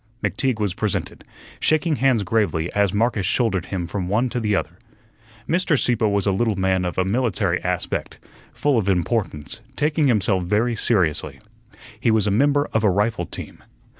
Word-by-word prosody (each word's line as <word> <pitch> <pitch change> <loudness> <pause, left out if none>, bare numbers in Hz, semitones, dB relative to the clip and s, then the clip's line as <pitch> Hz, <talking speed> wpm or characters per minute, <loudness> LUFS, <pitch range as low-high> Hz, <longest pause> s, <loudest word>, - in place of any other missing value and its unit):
McTeague 130 -5 0
was 100 -4 0
presented, 105 0 -3 0.4
shaking 155 -1 +2
hands 130 -5 +2
gravely 100 -7 0
as 100 -2 +2
Marcus 110 0 0
shouldered 95 -3 0
him 90 -3 -3
from 90 +1 -4
one 110 +7 +1
to 125 - -2
the 105 -3 0
other. 85 -1 -3 0.7
Mr. 170 -2 +2
Sieppe 120 -3 +1
was 100 -1 0
a 100 - +2
little 110 +2 +1
man 95 -1 +1
of 90 - -4
a 95 - +2
military 115 +1 0
aspect, - - -3 0.3
full 145 -5 +1
of 100 -2 -1
importance, 90 -4 -1 0.2
taking 150 +1 +1
himself 100 -6 +2
very 110 +6 +1
seriously. 95 -9 0 0.6
He - - +1
was 110 -2 +3
a 105 - +1
member 145 +6 +2
of 110 - +1
a 105 - +4
rifle 105 +4 0
team. - - -8
105 Hz, 170 wpm, -22 LUFS, 95-120 Hz, 0.7 s, a